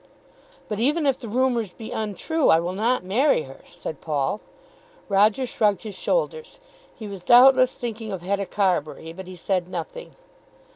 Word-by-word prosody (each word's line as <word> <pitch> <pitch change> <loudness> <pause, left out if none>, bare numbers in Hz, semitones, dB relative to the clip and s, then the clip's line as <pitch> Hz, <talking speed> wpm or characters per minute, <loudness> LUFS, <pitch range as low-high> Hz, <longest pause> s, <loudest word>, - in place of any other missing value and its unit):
"But 210 - -4
even 295 +6 +2
if 270 -2 +2
the 235 - -8
rumours 235 -4 0
be 225 - -9
untrue 220 - -1
I 160 - +6
will 175 +2 -3
not 230 +5 0
marry 220 - +2
her," 135 0 -13
said 155 - -7
Paul. 150 +5 -1 0.7
Roger 210 +5 +3
shrugged 210 -6 0
his 215 -2 -6
shoulders. 485 - -2 0.4
He 220 - -8
was 195 -3 -8
doubtless 255 +3 +6
thinking 225 -2 -5
of 185 -3 -5
Hetta 200 +1 -1
Carbury, 165 -4 -1
but 185 +1 -9
he 185 - -9
said 180 0 -2
nothing. - - -7
210 Hz, 160 wpm, -24 LUFS, 185-255 Hz, 0.7 s, I